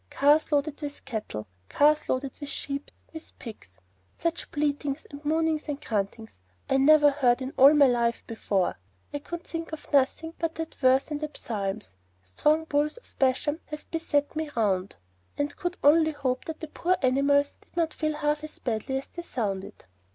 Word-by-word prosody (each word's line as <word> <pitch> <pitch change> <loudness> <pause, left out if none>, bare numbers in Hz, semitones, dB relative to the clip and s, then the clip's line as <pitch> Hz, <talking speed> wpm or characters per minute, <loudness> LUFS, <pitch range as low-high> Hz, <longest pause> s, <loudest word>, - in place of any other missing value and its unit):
Cars 295 +3 +3
loaded 295 +1 0
with 290 -1 -6
cattle, 215 - -4 0.2
cars 300 +1 +3
loaded 260 +1 -1
with 290 - -6
sheep, 280 0 -4 0.2
with 320 0 -8
pigs! 100 - -11 0.4
Such 335 0 -2
bleatings 290 -1 -1
and 285 +1 -9
mooings 315 0 0
and 290 -1 -2
gruntings, 220 - -3 0.3
I 270 - +3
never 295 +1 +6
heard 255 -4 +3
in 260 +1 -5
all 275 +3 +8
my 290 -1 +7
life 235 -2 +1
before. 200 - -1 0.3
I 290 - -2
could 340 +4 -7
think 330 -1 -5
of 315 -1 -9
nothing 290 +4 +2
but 330 -1 -1
that 325 0 -5
verse 260 +2 +3
in 295 - -2
the 305 0 -3
Psalms, 200 - -3 0.3
'Strong 300 - +1
bulls 295 +2 0
of 485 - -17
Bashan 275 +4 +2
have 300 0 -9
beset 310 -3 0
me 315 -1 -2
round,' 195 -4 0 0.4
and 290 0 -1
could 355 0 -3
only 315 +2 +5
hope 260 -3 -2
that 320 0 -6
the 315 - -4
poor 360 +4 0
animals 280 +2 +3
did - - -24
not 330 -2 +1
feel 310 -1 -1
half 295 0 0
as 310 - -8
badly 240 +2 -2
as 270 - -4
they 345 - -8
sounded. 200 - -4
290 Hz, 180 wpm, -27 LUFS, 255-310 Hz, 0.4 s, all